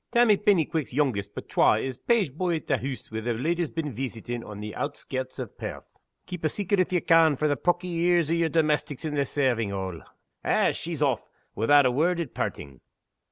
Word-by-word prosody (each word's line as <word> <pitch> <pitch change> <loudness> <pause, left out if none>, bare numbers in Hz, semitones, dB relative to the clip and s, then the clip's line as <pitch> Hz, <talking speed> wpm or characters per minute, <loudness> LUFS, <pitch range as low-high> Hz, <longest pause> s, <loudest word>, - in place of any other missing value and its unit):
Tammy 235 -3 +5
Pennyquick's 165 - +1
youngest 115 -8 0
but - - -7
twa - - +4
is 130 +3 -3
page 205 - +1
boy 175 +2 0
at 160 - -5
the 135 -4 +1
hoose 130 -1 -6
where 110 0 -3
the 120 +1 -1
leddy's 165 +6 -1
been 155 -4 -4
veesitin', 120 -1 -5
on 105 -2 -9
the 105 0 -6
outskirts 130 -1 -4
o' - - -2
Pairth. - - -8 0.4
Keep 180 -3 -7
a 155 - +2
secret 200 +1 0
if 185 - +2
ye 180 -2 +2
can 165 -3 +5
frae 150 +3 0
the 145 - +2
pawky 175 +3 0
ears 170 -2 +3
o' - - +3
yer 170 -1 +2
domestics 150 -3 0
in 155 - -2
the 140 -2 0
servants' 120 -8 0
hall! 95 -3 -4 0.4
Eh! - - +3
she's 165 -3 -3
aff, 130 -6 +1 0.3
without 140 +6 +5
a 125 - +4
word 165 +7 +1
at 165 -7 -4
parting!" 70 -2 -4
150 Hz, 205 wpm, -26 LUFS, 120-170 Hz, 0.4 s, Tammy